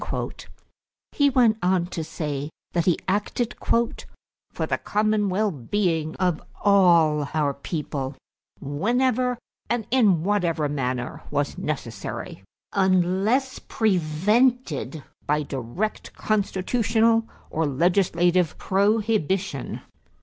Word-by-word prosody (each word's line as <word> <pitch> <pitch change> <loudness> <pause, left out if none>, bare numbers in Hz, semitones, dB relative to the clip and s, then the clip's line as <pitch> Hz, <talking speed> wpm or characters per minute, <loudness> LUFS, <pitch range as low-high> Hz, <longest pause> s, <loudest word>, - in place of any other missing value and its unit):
He 285 -1 +3
went 240 -5 +3
on 180 -1 +2
to 175 -2 -5
say 150 -2 -4 0.2
that 170 -1 +1
he 175 - +3
acted 210 +5 -1
"for 235 0 -3
the - - -1
common 210 -1 +1
well 205 +3 +1
being 160 - -1
of 180 -4 0 0.2
all 170 -7 +4
our 145 -2 +1
people 140 -2 -4 0.4
whenever 245 - 0 0.3
and 235 -3 0
in 205 -11 +4
whatever 175 -6 +1
manner 125 -3 -3
was 145 0 -1
necessary, 115 -9 -5 0.3
unless 190 +7 +2
prevented 190 - +1 0.2
by 150 +1 +1
direct 140 - -4
constitutional 225 +2 +1 0.2
or 160 0 0
legislative 175 +2 +2
prohibition." 195 - 0
185 Hz, 95 wpm, -24 LUFS, 150-215 Hz, 0.4 s, all